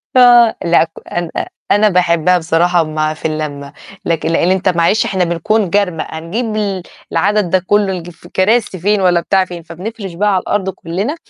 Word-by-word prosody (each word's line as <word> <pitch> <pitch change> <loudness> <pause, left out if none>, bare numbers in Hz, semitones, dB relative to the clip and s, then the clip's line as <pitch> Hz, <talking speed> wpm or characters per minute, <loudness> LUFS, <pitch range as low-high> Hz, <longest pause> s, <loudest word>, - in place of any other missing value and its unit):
آه 240 -2 +6
لأ، 170 -1 +4
ك 165 - -7 0.2
أنا 175 -1 -2 0.4
أنا 210 +1 +4
باحبها 180 -1 +2
بصراحة 170 +1 +2
مع 155 0 -2
في 155 - -13
اللمّة، 145 -2 -5 0.3
لكن 165 -1 -1
لإن 170 +2 +2
أنت 190 0 +1
معلش 175 +5 +2
إحنا 190 -2 0
بنكون 180 +4 0
جرمق، 180 -4 0
هنجيب 165 +10 -4
ل 195 -4 -2 0.3
لعدد 205 -2 +1
ده 185 - +3
كله 195 +1 +1
لج 175 -1 -6
في 175 0 -16
كراسي 200 0 +1
فين 205 +3 +1
والّا 180 -2 +3
بتاع 190 +2 +1
فين، 175 -2 -9
فبنفرش 190 +3 -7
بقى 205 +5 0
على 185 - +1
الأرض 195 -2 -1
كُلّنا 190 - -4
180 Hz, 180 wpm, -15 LUFS, 170-205 Hz, 0.4 s, آه